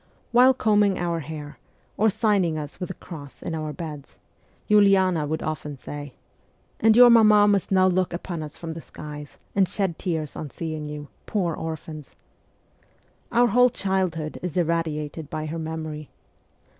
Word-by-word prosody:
While 250 +2 +6
combing 210 -3 +3
our 170 -1 -1
hair, 150 -1 -8 0.4
or 220 +1 +3
signing 205 -6 +1
us 150 -2 -7
with 180 - -3
the 185 - -7
cross 145 -5 -10
in - - -4
our 155 -1 -3
beds, 150 -4 -8 0.5
Uliana 190 -6 +4
would 160 +2 -2
often 150 -2 -4
say, 145 0 -8 0.3
' - - -39
And 220 0 +5
your 245 -1 +9
mamma 215 -3 +6
must 200 -2 +1
now 185 -1 +5
look 185 0 +2
upon 170 -1 -5
you 155 - -5
from 165 +2 -8
the 165 +1 -7
skies, 150 -2 -10 0.2
and 190 -3 +3
shed 195 -4 -1
tears 160 -5 -3
on 150 - -5
seeing 155 0 -5
you, 150 -1 -7 0.2
poor 180 -6 0
orphans.' 155 -2 -7 1.2
Our 240 0 +4
whole 250 +1 +5
childhood 185 -7 -2
is 180 -1 -4
irradiated 160 -3 -1
by 155 0 -4
her 160 +2 -4
memory. 155 -2 -5
165 Hz, 160 wpm, -24 LUFS, 155-195 Hz, 1.2 s, your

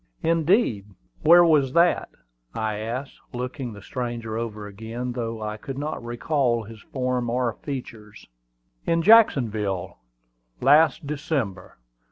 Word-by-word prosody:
"Indeed! 165 - +2 0.3
Where 175 +2 +7
was 145 -5 +3
that?" 170 +1 +3 0.5
I 110 -1 -2
asked, 120 +6 -5
looking 125 0 -5
the 100 -1 -12
stranger 120 -2 -4
over 110 -2 -4
again, 115 +5 -6
though 115 -2 -4
I 105 0 -4
could 135 +5 -7
not 145 -3 -4
recall 120 0 0
his 110 0 -12
form 125 -2 -2
or 120 -1 0
features. 110 -7 -8 0.6
"In 165 0 +2
Jacksonville, 110 - +3 0.6
last 150 +4 +4
December. 140 - -3
120 Hz, 120 wpm, -24 LUFS, 110-145 Hz, 0.6 s, Where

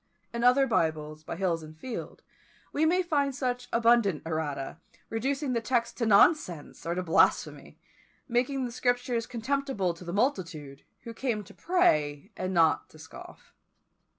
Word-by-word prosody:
In 235 0 -2
other 250 +3 +5
Bibles 155 -6 -1
by - - -5
Hills 170 -2 0
and 155 0 -12
Field 245 +8 -7 0.5
we 315 +2 +2
may 365 +3 +2
find 285 -5 0
such 250 -2 -2
abundant 230 -7 +3
errata, 155 -3 -3 0.3
reducing 270 +4 -1
the 230 - 0
text 235 -1 0
to 230 - 0
nonsense 200 - +3
or 170 - -1
to 185 - -2
blasphemy, 165 - +1 0.5
making 255 +2 0
the 240 - -5
Scriptures 245 -1 0
contemptible 250 -6 -1
to 170 - -13
the 170 - -5
multitude, 170 - -2 0.2
who 230 - -8
came 230 -4 -2
to - - -15
pray, 155 - +1
and 185 - -3
not 165 -3 +3
to - - -16
scoff. 160 0 -13
230 Hz, 150 wpm, -28 LUFS, 165-255 Hz, 0.5 s, other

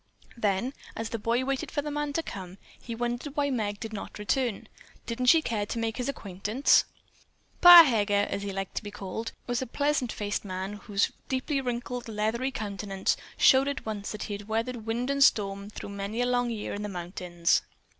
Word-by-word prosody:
Then, 225 +3 0 0.2
as 225 0 -4
the 230 - -3
boy 235 +4 0
waited 270 -1 -2
for 290 - -2
the 295 - -4
man 295 0 -2
to 330 - 0
come 185 - -7
up, - - -15 0.2
he 235 - -6
wondered 240 +4 -3
why 285 -1 +1
Meg 205 -5 -2
did 225 -1 -6
not 205 - -6
return. 210 +2 -1 0.4
Didn't 250 +2 -2
she 320 +4 +7
care 210 -3 -1
to - - -4
make 225 -1 -2
his 250 +1 -2
acquaintance? 210 +1 +2 0.8
"Pa 350 -1 +12
Heger," 205 -7 +2
as 200 - -3
he 200 0 -4
liked 195 0 -4
to - - 0
be 205 - -6
called, 205 +3 -5
was 245 0 -1
a 260 - -3
pleasant 285 -2 0
faced 205 0 -3
man 190 0 -4
whose 205 -1 0 0.2
deeply 270 +2 0
wrinkled, 245 -1 -4
leathery 220 +4 -1
countenance 200 -5 -2 0.2
showed 270 0 +6
at 280 - -3
once 210 -2 -4
that 210 - -5
he 205 - -5
had 205 0 -7
weathered 225 +1 -2
wind 240 +4 -1
and 280 0 +4
storm 200 -3 +2
through 210 - -8
many 200 +3 -4
a - - +2
long 245 -1 +1
year 220 -3 -4
in 205 - -4
the 210 - -4
mountains. 175 -1 0
225 Hz, 205 wpm, -28 LUFS, 205-255 Hz, 0.8 s, Pa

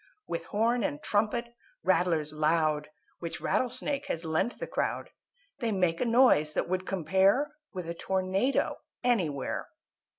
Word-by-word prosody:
With - - -4
horn 230 +3 +1
and 145 -6 -1
trumpet, 220 +7 0 0.3
rattlers 170 -5 +2
loud, 155 -1 +1 0.3
Which 170 0 -5
Rattle 250 +10 +1
Snake 285 +3 -1
has 165 +1 -3
lent 160 +9 0
the - - -4
crowd, - - -2 0.5
They 235 -4 0
make 180 -4 +1
a - - +2
noise 230 - +4
that - - 0
would 185 +1 -2
compare 195 - +2 0.2
With 180 -4 -6
a 170 - -2
tornado 190 +8 0 0.3
anywhere. 180 - 0
185 Hz, 140 wpm, -29 LUFS, 160-235 Hz, 0.5 s, noise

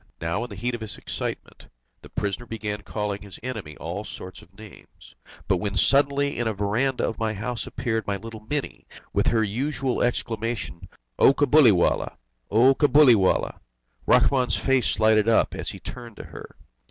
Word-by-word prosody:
Now 85 +7 -2
in 125 - -7
the 100 - -8
heat 120 +6 -2
of 120 - -5
his 110 - -7
excitement, - - -6 0.3
the - - -13
prisoner 105 +4 -3
began 105 -2 -4
calling 105 -2 -4
his 100 -3 -11
enemy 110 -12 -6
all 90 +6 -5
sorts 95 -3 -9
of 95 +3 -21
names, 110 -2 -15 0.3
when 100 +2 0
suddenly 140 0 +3
in 120 - 0
a 110 - -1
verandah 110 +7 0
of 115 - -5
my 110 -1 -1
house 115 +2 -4
appeared 115 -3 -2
my 100 - 0
little 110 +2 -8
Mini, 145 -2 -4 0.3
with - - +1
her 115 -1 +3
usual 130 +4 -2
exclamation: 115 -6 -2 0.3
"O 135 - +6
Cabuliwallah! 130 - +4 0.3
Cabuliwallah!" 130 -3 +4 0.5
Rahmun's 125 -1 +3
face 135 -3 +1
lighted 110 0 +4
up 115 - +3
as - - -4
he - - -8
turned 120 -3 -9
to - - -8
her. - - -11
115 Hz, 160 wpm, -25 LUFS, 105-125 Hz, 0.5 s, O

